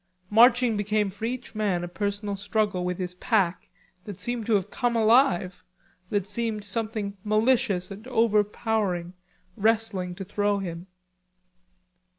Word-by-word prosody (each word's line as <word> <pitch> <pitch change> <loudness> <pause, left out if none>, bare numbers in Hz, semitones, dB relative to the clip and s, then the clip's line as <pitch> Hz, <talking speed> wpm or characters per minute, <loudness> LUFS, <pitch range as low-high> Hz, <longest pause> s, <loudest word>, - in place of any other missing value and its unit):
Marching 240 +1 +5
became 205 0 0
for 205 +3 -6
each 245 0 -5
man 200 -5 0
a - - -3
personal 205 +2 -3
struggle 205 -2 -1
with 180 0 -2
his 180 -1 -4
pack, 185 -2 0 0.4
that 200 -3 -8
seemed 235 +2 -1
to 225 - +3
have 195 -3 -1
come 240 -1 0
alive, 215 -6 +3 0.5
that 205 -3 0
seemed 215 0 -2
something 210 -1 -3
malicious 215 -3 +1
and 210 +5 -9
overpowering, 210 -5 0 0.4
wrestling 215 -4 0
to 195 - -7
throw 205 +1 0
him. 175 -2 -6
205 Hz, 135 wpm, -26 LUFS, 190-225 Hz, 0.5 s, Marching